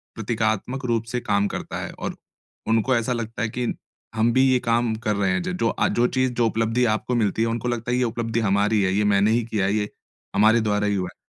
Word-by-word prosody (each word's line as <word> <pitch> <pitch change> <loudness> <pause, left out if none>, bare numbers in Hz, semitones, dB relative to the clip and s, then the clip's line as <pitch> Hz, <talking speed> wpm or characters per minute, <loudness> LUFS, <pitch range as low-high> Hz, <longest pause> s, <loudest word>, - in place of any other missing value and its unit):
प्रतीकात्मक 110 +3 -2
रूप 115 -2 0
से 125 - -1
काम 100 -3 +1
करता - - -5
है - - -5
और - - -4 0.5
उनको 115 +3 +2
ऐसा 115 +1 0
लगता 115 -1 -4
है 115 - 0
कि 120 +1 -2 0.4
हम 110 +1 +3
भी 130 - +4
ये 130 - +3
काम 115 0 +2
कर 105 -1 +1
रहे 100 -2 +1
हैं, 90 0 0
ज - - -3
जो 115 - +2
आ - - +1
जो 120 +1 +2
चीज़, 130 0 0
जो 120 -1 +1
उपलब्धि 115 +2 +1
आपको 125 +3 -2
मिलती 110 -2 +1
है 115 - +2
उनको 115 +1 -2
लगता 120 -1 -2
है - - +2
कि - - +1
ये - - +3
उपलब्धि 115 0 -2
हमारी 105 0 +2
है, 95 -1 +1
ये 105 +2 +2
मैंने 105 +1 +3
ही 115 +1 +2
किया 110 -4 -1
है, 100 - +1
ये 105 -1 -1 0.5
हमारे 110 +3 +5
द्वारा 105 -1 0
ही 100 - +1
हुआ 90 -2 -2
है। - - -56
115 Hz, 255 wpm, -23 LUFS, 105-120 Hz, 0.5 s, हमारे